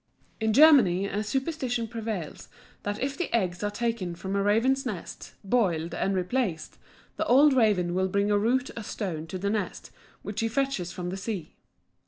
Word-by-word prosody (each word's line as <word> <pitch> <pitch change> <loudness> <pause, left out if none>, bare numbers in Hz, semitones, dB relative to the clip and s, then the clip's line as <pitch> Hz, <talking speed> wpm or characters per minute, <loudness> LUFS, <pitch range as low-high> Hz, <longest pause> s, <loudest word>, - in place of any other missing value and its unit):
= - - -36
In 220 0 +2
Germany 240 - +6
a 200 +1 -2
superstition 255 -1 -2
prevails 220 -7 -5 0.3
that 205 0 -3
if 275 +1 -2
the 360 - -3
eggs 180 -6 0
are 205 - +1
taken 205 -5 -2
from 190 +3 -4
a 200 - +2
raven's 230 +7 +2
nest, 210 -9 -6
boiled, 180 -7 +1
and 195 - 0
replaced, 185 -2 -2 0.4
the 320 - 0
old 280 +3 +6
raven 205 -8 +2
will 190 +1 +1
bring 200 +2 +1
a 205 - +3
root 250 +5 +1
or 230 - -5
stone 180 -7 -4
to 185 - -5
the 200 +2 -1
nest, 210 -4 -3 0.3
which 205 +1 -5
he 225 - +1
fetches 260 -7 -1
from 175 -1 -5
the 190 - -4
sea. 195 -4 -5
210 Hz, 185 wpm, -27 LUFS, 185-245 Hz, 0.4 s, Germany